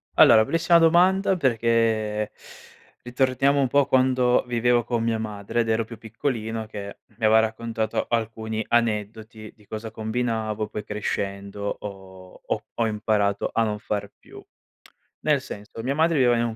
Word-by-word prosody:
Allora, 110 - +7
bellissima 165 +7 +3
domanda 180 +3 +4
perché 115 -5 +1 0.7
ritorniamo 130 +3 +1
un 135 - +2
po' 140 0 +3
quando 130 -1 +3
vivevo 120 0 +2
con 120 0 -1
mia 115 -1 0
madre, 105 +1 -3
ed 115 - -2
ero 110 0 +1
più 115 0 -10
piccolino 110 -1 -4
che 100 -2 -8 0.2
mi 115 - -1
aveva 110 +1 +6
raccontato 110 0 -2
alcuni 110 -1 -2
aneddoti 110 -1 -2
di 105 - -23
cosa 110 +2 -6
combinavo, 110 -1 -2
poi 105 - -6
crescendo, 100 -1 -4 0.2
ho 95 -2 -11
ho - - -2
ho 115 - 0
imparato 105 -2 0
a 115 - +2
non 105 -1 -2
far 100 -1 -4
più. - - -14 0.8
Nel 150 -3 +1
senso, 105 0 -9
mia 135 +3 -1
madre 160 0 +2
viveva 120 -2 +4
in 120 - +1
un 115 - -4
110 Hz, 150 wpm, -24 LUFS, 105-125 Hz, 0.8 s, Allora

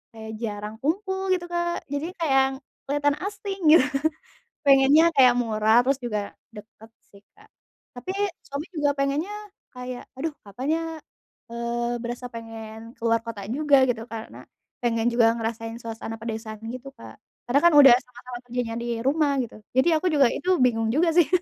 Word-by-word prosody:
kayak 220 0 -8
jarang 210 -1 -4
kumpul 380 +5 -1
gitu, 350 -1 -5
Kak, 345 0 -1
jadinya 315 +6 -3
kayak 295 -4 +1
yang 270 - -5 0.3
kelihatan 290 0 +1
asing 400 -1 -6 0.2
gitu 295 - +6 0.8
pengennya 275 +2 +6
kayak 255 -3 +7
murah, 225 -1 +3
terus 270 +1 +1
juga 210 -4 -3 0.2
deket 220 +1 -13 0.2
sih, 200 - -16 0.2
Kak, - - -20 0.5
tapi 250 +10 -5 0.4
suami 280 +2 -5
juga 295 -5 +1
pengennya 285 +8 -1 0.4
kayak, 250 0 -7
aduh 310 +4 -3
kapan 225 +7 -6
ya, 330 - -3 0.7
eee, 235 0 -2
berasa 240 +1 -5
pengen 225 0 -9
keluar 230 0 +1
kota 225 -4 -6
juga 285 0 +4
gitu 225 -2 -2
karena 225 -1 -9 0.3
pengen 230 -1 0
juga 230 -1 +4
ngerasain 225 0 -4
suasana 225 0 -6
pedesaan 220 -1 -5
gitu, 255 +3 -8
Kak, - - -12 0.3
karena 275 - +4
kan 345 - +6
udah 280 -3 +10
sama-sama 250 0 -10
kerjanya 240 -2 -3
di 235 - -5 0.2
rumah 285 +1 +2
gitu, 230 - -9 0.2
jadi 260 +6 +4
aku 370 - -1
juga 280 -3 +5
itu 365 - -3
bingung 225 -3 +2
juga 330 +3 +3
sih. 345 - +6
245 Hz, 160 wpm, -25 LUFS, 225-285 Hz, 0.8 s, udah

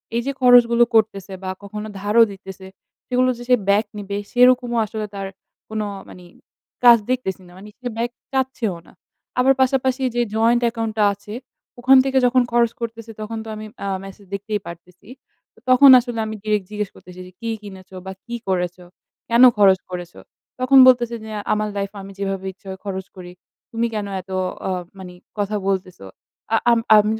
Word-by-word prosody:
এই 235 - +1
যে 275 - -1
খরচগুলো 240 -1 +6
করতেছে 200 -3 +1
বা 185 - -4
কখনো 210 +2 -6
ধারও 210 +3 +4
দিতেছে। 190 -1 -11 0.4
সেগুলো 255 0 +2
যে 240 - -9
সে 250 - +7
ব্যাক 210 +2 +3
নিবে, 200 0 -4
সেরকমও 245 -1 +4
আসলে 215 +1 -5
তার 195 -1 -4 0.4
কোনো 215 -1 -3 0.2
মানি 180 -1 -13 0.6
কাজ 240 -1 +9
দেখতেছি 220 -7 -2
না। - - -16
মানি 205 +2 -12
সে 250 - -5
ব্যাক 235 +1 -1 0.2
চাচ্ছে 265 -3 -1
ও - - -9
না। - - -18 0.5
আবার 265 +2 +5
পাশাপাশি 260 0 +1
যে 240 - +2
জয়েন্ট 235 +2 +3
অ্যাকাউন্টটা 225 -2 -1
আছে, 205 +1 -11 0.5
ওখান 265 +2 +6
থেকে 265 0 0
যখন 250 +1 +4
খরচ 235 -1 +3
করতেছে 230 -1 -6
তখন 225 +1 -5
তো - - -8
আমি 215 0 -8 0.2
আ - - -2 0.2
মেসেজ 195 +1 -12
দেখতেই 205 +1 -3
পারতেছি। 175 +3 -12 0.5
তো - - -23
তখন 260 +2 +8
আসলে 240 -2 -5
আমি 220 0 -5
ডিরেক্ট 210 -3 0
জিজ্ঞেস 210 -1 -3
করতেছি 180 0 -14
যে, - - -14
"কি 230 - -4
কিনেছ 190 -2 -12 0.2
বা 190 - -5
কি 235 0 -5
করেছো? 180 -1 -2 0.4
কেনো 240 +2 +7
খরচ 195 -2 +5
করেছ" 175 -1 -6 0.5
তখন 255 +2 +4
বলতেছে 240 -2 +4
যে, 220 - -9 0.2
"আমার 215 0 -1
লাইফ 200 0 -3
এ - - -8
আমি 195 - -10
যেভাবে 195 -1 -3
ইচ্ছা 195 +1 -20
হয় 190 0 -7
খরচ 190 -1 -5
করি। 180 -1 -9 0.4
তুমি 230 +1 -1
কেনো 205 -2 -3
এত 190 - -15 0.4
আ - - -1 0.3
মানি 180 -1 -9 0.3
কথা 205 +1 -1
বলতেছ? 185 -2 -2 0.6
আ - - +5
আ - - +6 0.2
আম 210 0 +6
215 Hz, 185 wpm, -21 LUFS, 195-240 Hz, 0.6 s, কাজ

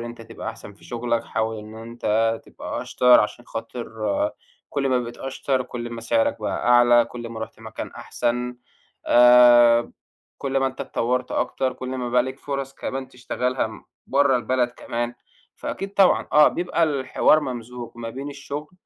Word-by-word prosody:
إن 115 - -5
أنت 120 -1 -9
تبقى 115 0 -7
أحسن 105 - -9
في 100 - -20
شغلك، 120 -1 -2
حاول 110 0 -2
إن 110 +1 -10
أنت 115 0 -1
تبقى - - -6
أشطر، 125 -1 +5
عشان 115 +3 -3
خاطر 115 +1 -6 0.8
كُلّ 140 -1 0
ما 130 -1 +3
بقيت 120 -1 -6
أشطر، 135 0 -1
كُلّ 120 -1 -6
ما 115 - -6
سعرك 115 -1 +1
بقى 105 - -2
أعلى، 120 -1 +6
كُلّ 120 0 -8
ما 115 -1 -7
رُحت 110 - -7
مكان - - -7
أحسن 125 +1 -2 0.5
آآ، 120 -1 +7 0.5
كُلّ 135 -1 -2
ما 135 0 +2
أنت 130 - -6
اتطوّرت 125 +2 -1
أكتر، 130 -1 -1
كُلّ 130 - -7
ما 125 -1 -3
بقى 125 0 +3
ليك 130 +1 -6
فُرَص 135 -1 -4
كمان 135 0 -5
تشتغلها 125 -2 -3 0.2
برّه 140 -1 +3
البلد 125 0 +1
كمان، 120 0 -4 0.4
فأكيد 195 +1 -5
طبعًا 195 -2 +4
آه، 150 0 +8
بيبقى 170 -1 0
الحوار 145 +1 +3
ممزوج 125 -3 -6
ما 115 -1 -6
بين 135 +4 -6
الشغل 145 +3 -7
125 Hz, 165 wpm, -23 LUFS, 115-130 Hz, 0.8 s, آه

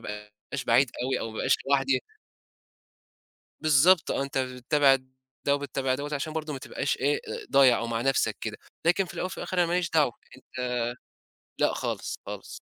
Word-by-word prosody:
ابقاش 105 +5 -7
بعيد 120 +3 +4
أوي، 130 0 0
أو 115 - -4
ما 110 - -10
ابقاش - - +3 0.2
لوحدي. 135 -2 +3 1.6
بالضبط 155 +3 +5
آه - - 0
أنت 140 0 -4
بتتابع 130 +2 +3 0.5
ده 140 - +4
وبتتابع 135 -2 -1
دوّة 145 +2 -5
عشان 150 +2 -3
برضو 155 -1 -3
ما 135 - -5
تبقاش 140 - -2
إيه 145 +3 +1 0.3
ضايع 135 -3 +6
أو 115 - -3
مع 115 -1 -1
نَفْسك 135 +1 +1
كده، - - -4 0.3
لكن 180 +3 +3
في - - -10
الأول - - -2
وفي 185 - -6
الآخر 185 - -4
أنا 175 - +5
ما 170 - -2
ليش 180 -1 +1
دعوة، 150 -6 +3 0.3
أنت 130 - -21 1.0
لأ - - +2
خالص، - - -3
خالص، - - -7
135 Hz, 175 wpm, -27 LUFS, 130-155 Hz, 1.6 s, ضايع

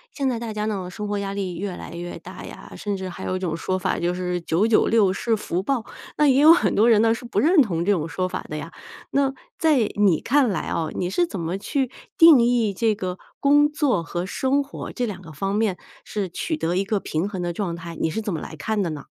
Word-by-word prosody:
现 275 -2 0
在 240 -3 -2
大 230 -2 -5
家 210 0 -2
呢， 195 -4 -3
生 210 +3 -5
活 205 0 -1
压 200 0 -3
力 185 -4 -3
越 190 -1 -4
来 - - -9
越 175 +1 -6
大 - - -10
呀， - - -11
甚 205 -2 -3
至 190 0 -5
还 - - -8
有 185 - -2
一 - - -2
种 170 -4 -2
说 185 +3 -2
法 185 - -1
就 175 +1 0
是 180 -1 -2
996 205 +3 +3
是 225 +3 0
福 185 -4 -2
报。 240 +2 -1 0.3
那 300 - +4
也 270 0 +5
有 310 +2 +9
很 210 - +2
多 225 +3 +4
人 220 -2 +5
呢 225 0 +4
是 230 - -7
不 240 - -1
认 330 +1 +5
同 175 -9 0
这 205 - +3
种 165 -6 0
说 185 +3 -2
法 - - -5
的 155 - -4
呀， 155 +2 -7 0.4
那 275 -1 +2 0.3
在 315 -3 +4 0.2
你 200 -6 +3
看 275 0 +2
来 190 - -1
啊， 160 - -1
你 180 - -1
是 345 - +1
怎 200 - -5
么 170 +3 -2
去 260 +5 -2 0.3
定 325 -6 +8
义 235 -3 +2
这 220 +2 +1
个 185 -2 -4 0.2
工 290 +1 +5
作 280 - +1
和 175 +2 -4
生 270 +8 0
活 280 - -8
这 250 - -2
两 205 -5 -6
个 165 -3 -11
方 195 +7 -3
面 210 -4 +1 0.3
是 200 -3 -3
取 315 - -3
得 170 - -1
一 190 - +2
个 200 +1 -1
平 170 +2 -2
衡 190 -3 -4
的 175 -1 -2
状 175 -2 -3
态， 170 0 -8
你 - - +1
是 165 - -3
怎 210 -3 -3
么 160 - -2
来 155 - -8
看 210 +8 -1
的 180 - -1
呢？ 150 -2 -7
200 Hz, 270 characters per minute, -23 LUFS, 175-235 Hz, 0.4 s, 有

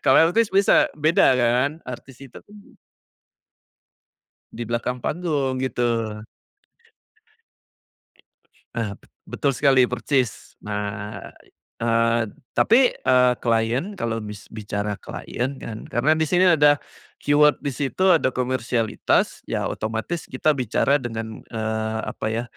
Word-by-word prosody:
kalau 165 - +6
artis 230 +1 +2
bisa 250 +11 +4
beda 155 -3 +4
kan, 125 +5 +1
artis 125 +1 -9
itu 135 - -12
kan 210 - -18 2.0
di - - -5
belakang 120 +2 -2
panggung, 145 -3 -1
gitu. 125 -2 -2 2.9
Ah 110 -4 -2
bet - - -25 0.2
betul 140 - 0
sekali, 135 -1 +4
persis. 125 0 -1
Nah, 105 0 -4 0.6
eee, 115 0 +2 0.3
tapi, 245 +2 +4
eee, 125 -1 +3
klien 120 - 0
kalau 115 -1 -2
bis 105 -1 -9
bicara 105 -1 -4
klien 130 +6 -5
kan, 110 -1 -7
karena 140 +7 +2
di 160 - +1
sini 180 +4 +3
ada 145 -1 +4 0.4
keyword 150 +1 +4
di 145 - -5
situ 150 +7 0
ada 130 -5 +1
komersialitas, 125 -3 0
ya - - -2
otomatis 110 +10 -3
kita 150 +3 0
bicara 130 +2 +1
dengan 115 -2 -6
eee, 110 -1 -2
apa - - -6
ya 115 +1 -2
125 Hz, 115 wpm, -23 LUFS, 115-145 Hz, 2.9 s, kalau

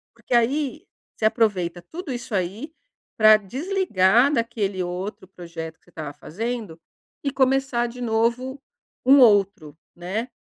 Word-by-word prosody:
porque 235 +1 -6
aí, 255 +3 +1 0.3
você 215 - -2
aproveita 200 -6 +1
tudo 330 -4 -5
isso 240 -1 -7
aí, 200 - -2 0.5
pra 215 -1 +8
desligar 250 - +2
daquele 225 -6 -1
outro 185 +2 -5
projeto 170 -3 -8
que - - -42
você - - -22
estava 155 -3 -7
fazendo, 215 0 -5 0.4
e 280 - -1
começar 265 -2 +1
de 240 +1 -10
novo 240 +4 0 0.4
um 275 +2 +7
outro, 195 - +3 0.2
né, 190 +7 -4
225 Hz, 135 wpm, -23 LUFS, 185-255 Hz, 0.5 s, pra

